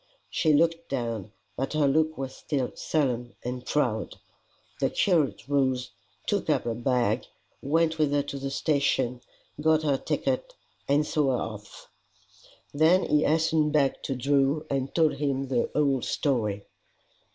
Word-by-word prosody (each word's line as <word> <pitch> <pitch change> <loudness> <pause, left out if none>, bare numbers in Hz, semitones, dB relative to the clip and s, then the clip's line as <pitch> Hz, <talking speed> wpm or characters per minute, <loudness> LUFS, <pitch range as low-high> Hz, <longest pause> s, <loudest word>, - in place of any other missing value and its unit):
She 155 - +2
looked 165 +2 +2
down, 115 -6 -3 0.2
but 135 +3 -3
her 155 -2 +3
look 155 +3 +2
was 135 -1 -4
still 135 -5 -2
sullen 125 -6 -1
and 125 0 -4
proud. 120 -8 -1 0.6
The - - +2
curate 160 -9 +1
rose, 130 -3 +1 0.3
took - - -1
up - - +2
her 120 - -2
bag, 120 -1 0 0.3
went 160 +3 +1
with 150 -2 +2
her 145 0 +2
to 140 -1 -6
the 135 0 -3
station, 135 -4 0 0.4
got 155 0 +3
her 140 -3 +2
ticket, - - -2 0.3
and 145 +2 +3
saw 145 -4 +1
her 125 - 0
off. 105 0 -12 0.9
Then 160 +5 +4
he 150 - +2
hastened 155 -1 +2
back 140 -3 +2
to 135 - -3
Drew, 140 +3 +1
and 135 -1 -1
told 160 -4 +3
him 135 -2 -1
the 125 -3 +1
whole 140 -3 +2
story. 105 -9 -1
140 Hz, 150 wpm, -27 LUFS, 125-155 Hz, 0.9 s, Then